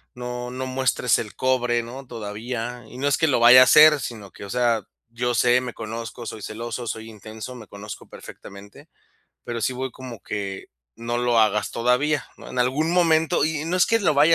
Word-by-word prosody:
no 125 Hz, 0 st, -5 dB
no 130 Hz, +1 st, -4 dB
muestres 130 Hz, -2 st, +1 dB
el 105 Hz, -, -5 dB
cobre", 125 Hz, -2 st, +1 dB
¿no?, 125 Hz, +4 st, -9 dB
todavía. 115 Hz, +2 st, -6 dB
Y 125 Hz, -, -11 dB
no 140 Hz, +2 st, -1 dB
es 145 Hz, -, +2 dB
que 160 Hz, -, +2 dB
lo 140 Hz, -, +2 dB
vaya 125 Hz, +2 st, +9 dB
a -, -, +10 dB
hacer, 150 Hz, +2 st, +7 dB
sino 110 Hz, -4 st, -7 dB
que, -, -, -11 dB
o 100 Hz, -, -8 dB
sea, 120 Hz, -4 st, +1 dB, 0.2 s
yo 120 Hz, +1 st, -2 dB
sé, 125 Hz, +1 st, +3 dB
me 125 Hz, -2 st, -6 dB
conozco, 115 Hz, +2 st, -7 dB
soy 110 Hz, -, -7 dB
celoso, 115 Hz, +3 st, -6 dB
soy 110 Hz, 0 st, -5 dB
intenso, 110 Hz, +3 st, -9 dB
me 110 Hz, -4 st, -11 dB
conozco 100 Hz, 0 st, -10 dB
perfectamente, 100 Hz, +1 st, -13 dB, 0.6 s
pero 120 Hz, -1 st, -4 dB
sí 125 Hz, +4 st, -1 dB
voy 130 Hz, +1 st, -4 dB
como 125 Hz, -4 st, -10 dB
que: 100 Hz, -2 st, -5 dB, 0.3 s
"No 120 Hz, +1 st, -3 dB
lo 120 Hz, -1 st, +2 dB
hagas, 105 Hz, -1 st, +2 dB
todavía", 125 Hz, +5 st, +1 dB
¿no?, -, -, -11 dB
en 125 Hz, -, -6 dB
algún 135 Hz, +6 st, +1 dB
momento 160 Hz, -4 st, +3 dB
y 155 Hz, -1 st, -2 dB
no 175 Hz, +2 st, 0 dB
es 180 Hz, -, +5 dB
que 230 Hz, 0 st, +1 dB
lo 155 Hz, -7 st, +2 dB
vaya 150 Hz, +4 st, +5 dB
120 Hz, 205 wpm, -23 LUFS, 115-130 Hz, 0.6 s, a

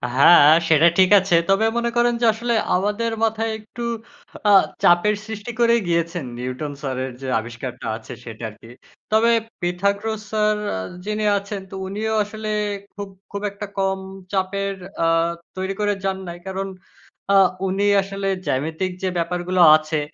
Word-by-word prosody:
হ্যাঁ 145 Hz, +2 st, +8 dB, 0.2 s
সেটা 160 Hz, +1 st, +6 dB
ঠিক 185 Hz, -, +6 dB
আছে। 190 Hz, -2 st, +1 dB
তবে 195 Hz, +3 st, +3 dB
মনে 235 Hz, 0 st, 0 dB
করেন 240 Hz, 0 st, +3 dB
যে -, -, +3 dB
আসলে 235 Hz, +2 st, -2 dB, 0.2 s
আমাদের 210 Hz, +5 st, 0 dB
মাথায় 225 Hz, 0 st, 0 dB
একটু 220 Hz, +3 st, -11 dB, 0.7 s
আ -, -, +6 dB, 0.3 s
চাপের 175 Hz, +5 st, +4 dB
সৃষ্টি 220 Hz, +1 st, -6 dB
করেই 235 Hz, -1 st, +4 dB
গিয়েছেন 170 Hz, -2 st, -1 dB
নিউটন 130 Hz, +4 st, -4 dB
স্যারের 130 Hz, -1 st, -3 dB
যে 135 Hz, -, -5 dB
আবিষ্কারটা 120 Hz, +2 st, -7 dB
আছে 110 Hz, -, -10 dB
সেটা 115 Hz, -1 st, -9 dB
আরকি। 110 Hz, +2 st, -16 dB, 0.4 s
তবে 225 Hz, +2 st, +4 dB, 0.3 s
পিথাগোরাস 200 Hz, +5 st, -1 dB
স্যার 215 Hz, 0 st, +2 dB, 0.2 s
আ -, -, -3 dB, 0.3 s
যিনি 215 Hz, 0 st, -2 dB
আছেন 200 Hz, 0 st, -5 dB
তো -, -, -7 dB
উনিও 215 Hz, +3 st, -2 dB
আসলে 215 Hz, +1 st, -6 dB, 0.5 s
খুব, 200 Hz, -1 st, -6 dB, 0.2 s
খুব 200 Hz, -, -4 dB
একটা 205 Hz, +1 st, -7 dB
কম 190 Hz, 0 st, 0 dB, 0.3 s
চাপের 195 Hz, +1 st, -1 dB, 0.3 s
আ -, -, +3 dB, 0.5 s
তৈরি 190 Hz, +1 st, -2 dB
করে 205 Hz, 0 st, +1 dB
যান 195 Hz, -1 st, -1 dB
নাই। 170 Hz, 0 st, -6 dB
কারণ 190 Hz, +1 st, -3 dB, 0.7 s
আ -, -, +5 dB, 0.3 s
উনি 195 Hz, +2 st, 0 dB, 0.2 s
আসলে 195 Hz, 0 st, -4 dB, 0.2 s
জ্যামিতিক 160 Hz, +7 st, -1 dB
যে 185 Hz, -, +1 dB
ব্যাপারগুলো 180 Hz, +2 st, 0 dB, 0.2 s
আছে 155 Hz, 0 st, -3 dB
195 Hz, 150 wpm, -21 LUFS, 170-210 Hz, 0.7 s, হ্যাঁ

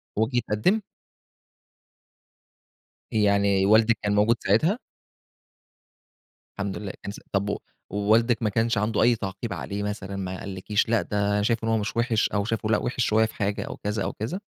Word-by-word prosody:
وجِه 110 Hz, +4 st, +1 dB
اتقدِّم؟ 150 Hz, -, +1 dB, 2.3 s
يعني 100 Hz, -2 st, +3 dB
والدِك 110 Hz, +2 st, +5 dB
كان 105 Hz, 0 st, +1 dB
موجود 105 Hz, +3 st, +4 dB
ساعتها؟ 155 Hz, -, +2 dB, 1.8 s
الحمد 100 Hz, -1 st, -2 dB
لله، 100 Hz, -3 st, -5 dB
كان 100 Hz, -, -4 dB
س -, -, -10 dB
طَب 100 Hz, +1 st, 0 dB
و -, -, -1 dB, 0.3 s
ووالدِك 110 Hz, +4 st, +3 dB
ما 110 Hz, -, +2 dB
كانش 115 Hz, +1 st, +1 dB
عَنده 105 Hz, +2 st, +1 dB
أي 120 Hz, +1 st, +5 dB
تعقيب 100 Hz, +2 st, -5 dB
عليه 100 Hz, 0 st, -4 dB
مثلًا، 100 Hz, -1 st, -4 dB
ما 95 Hz, -1 st, -4 dB
قالّكيش 100 Hz, +3 st, -1 dB
لأ، 115 Hz, -2 st, +3 dB
ده 100 Hz, 0 st, 0 dB
شايف 115 Hz, +1 st, 0 dB
إن 115 Hz, -, 0 dB
هو 110 Hz, -, +3 dB
مش 105 Hz, +2 st, -3 dB
وِحش 115 Hz, -2 st, +2 dB
أو 100 Hz, -1 st, -1 dB
شايفه 110 Hz, -1 st, -2 dB
لأ، 110 Hz, -, +4 dB
وِحش 125 Hz, -1 st, -1 dB
شوية 110 Hz, +1 st, +3 dB
في 110 Hz, -, -7 dB
حاجة 100 Hz, -1 st, -1 dB
أو -, -, -7 dB
كذا 105 Hz, 0 st, -2 dB
أو -, -, -3 dB
كذا؟ 115 Hz, -, -4 dB
105 Hz, 170 wpm, -25 LUFS, 100-115 Hz, 2.3 s, والدِك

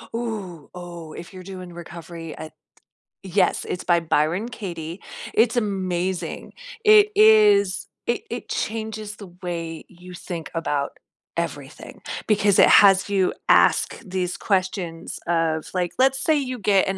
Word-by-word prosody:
Ooh, 200 Hz, -10 st, -5 dB
oh, 170 Hz, -3 st, -9 dB
if 170 Hz, -, -10 dB
you're 185 Hz, -, -9 dB
doing 185 Hz, -2 st, -9 dB
recovery 170 Hz, -1 st, -9 dB
at 155 Hz, -1 st, -8 dB, 0.7 s
yes, 190 Hz, -1 st, +1 dB
it's 180 Hz, -, -3 dB
by 175 Hz, -1 st, +3 dB
Byron 165 Hz, +7 st, 0 dB
Katie. 175 Hz, -6 st, -6 dB, 0.3 s
It's 225 Hz, +1 st, +3 dB
amazing. 185 Hz, -5 st, -2 dB, 0.3 s
It 425 Hz, -1 st, +7 dB
is 425 Hz, -1 st, +5 dB, 0.2 s
it 415 Hz, -, 0 dB
it -, -, -5 dB
changes 215 Hz, -1 st, -4 dB
the 200 Hz, -, -10 dB, 0.2 s
way 165 Hz, -2 st, -5 dB
you 180 Hz, 0 st, -13 dB
think 170 Hz, -3 st, -6 dB
about 145 Hz, -4 st, -2 dB, 0.4 s
everything 145 Hz, -4 st, -5 dB, 0.3 s
because 205 Hz, -2 st, +3 dB
it -, -, +7 dB
has 195 Hz, 0 st, +6 dB
you 190 Hz, -2 st, +2 dB, 0.2 s
ask -, -, +4 dB
these 180 Hz, -2 st, -2 dB
questions 185 Hz, -4 st, -2 dB
of, 165 Hz, -2 st, 0 dB
like, 180 Hz, -2 st, -1 dB
let's 270 Hz, +1 st, +3 dB
say 320 Hz, -, +3 dB
you 255 Hz, -3 st, -3 dB
get 195 Hz, -1 st, +3 dB
an 190 Hz, 0 st, -1 dB
185 Hz, 140 wpm, -23 LUFS, 170-210 Hz, 0.7 s, It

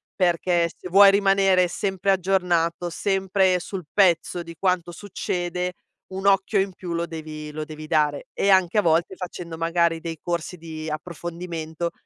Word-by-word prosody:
perché 175 Hz, -1 st, +2 dB
se 180 Hz, -, -9 dB
vuoi 200 Hz, +2 st, +8 dB
rimanere 195 Hz, -2 st, +3 dB
sempre 195 Hz, +1 st, -1 dB
aggiornato, 180 Hz, -2 st, +1 dB
sempre 190 Hz, 0 st, +1 dB
sul 185 Hz, 0 st, -6 dB
pezzo 175 Hz, -2 st, +2 dB
di 170 Hz, 0 st, -10 dB
quanto 180 Hz, -2 st, 0 dB
succede, 180 Hz, -1 st, -3 dB, 0.4 s
un 190 Hz, +1 st, -5 dB
occhio 195 Hz, +1 st, +3 dB
in 195 Hz, 0 st, -1 dB
più 180 Hz, -1 st, -7 dB
lo 170 Hz, 0 st, -1 dB
devi 155 Hz, -2 st, -7 dB
lo 155 Hz, +1 st, -4 dB
devi 155 Hz, 0 st, -9 dB
dare. 150 Hz, -3 st, +1 dB
E 200 Hz, -, 0 dB
anche 190 Hz, 0 st, +4 dB
a -, -, +4 dB
volte 170 Hz, +1 st, +1 dB
facendo 175 Hz, -2 st, -7 dB
magari 165 Hz, 0 st, +1 dB
dei 165 Hz, -1 st, -6 dB
corsi 175 Hz, +1 st, -3 dB
di 160 Hz, -1 st, -7 dB
approfondimento 170 Hz, +1 st, -5 dB
175 Hz, 155 wpm, -24 LUFS, 165-190 Hz, 0.4 s, vuoi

